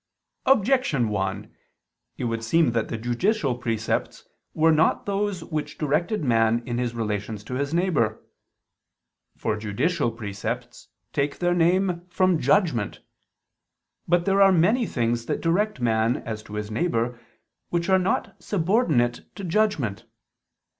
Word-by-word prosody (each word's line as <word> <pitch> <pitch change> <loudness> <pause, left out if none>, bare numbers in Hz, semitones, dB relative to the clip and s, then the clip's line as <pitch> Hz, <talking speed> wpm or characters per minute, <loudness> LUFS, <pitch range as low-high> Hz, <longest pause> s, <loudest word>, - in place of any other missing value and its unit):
Objection 230 - +3
1: 95 0 -3 0.6
It - - -4
would 115 -1 -2
seem 155 +4 +3
that 115 -1 0
the 115 - -4
judicial 125 - 0
precepts 115 -2 -2 0.3
were 160 +1 +4
not 160 0 +2
those 200 -3 -1
which 155 -3 -4
directed 160 +6 0
man 115 -2 +2
in 120 0 -2
his 120 -1 -2
relations 105 -1 -3
to 120 - -7
his 140 +2 -1
neighbor. 160 - +1 1.2
For 110 - -1
judicial 120 - 0
precepts 115 +2 -5 0.3
take 140 0 -1
their 175 0 +1
name 175 +1 +2
from 185 -2 +2
judgment. 145 - +1 1.1
But 175 0 +2
there 195 0 +3
are 195 0 +7
many 210 +8 +3
things 115 -1 -1
that - - -1
direct 195 +3 0
man 115 0 +2
as 110 -2 -4
to 105 - -9
his 105 0 -4
neighbor, 120 -4 -1 0.5
which 170 0 -1
are 190 -1 +4
not 185 +1 -1
subordinate 165 - +1
to 200 - -7
judgment. 165 - 0
140 Hz, 135 wpm, -25 LUFS, 115-180 Hz, 1.2 s, are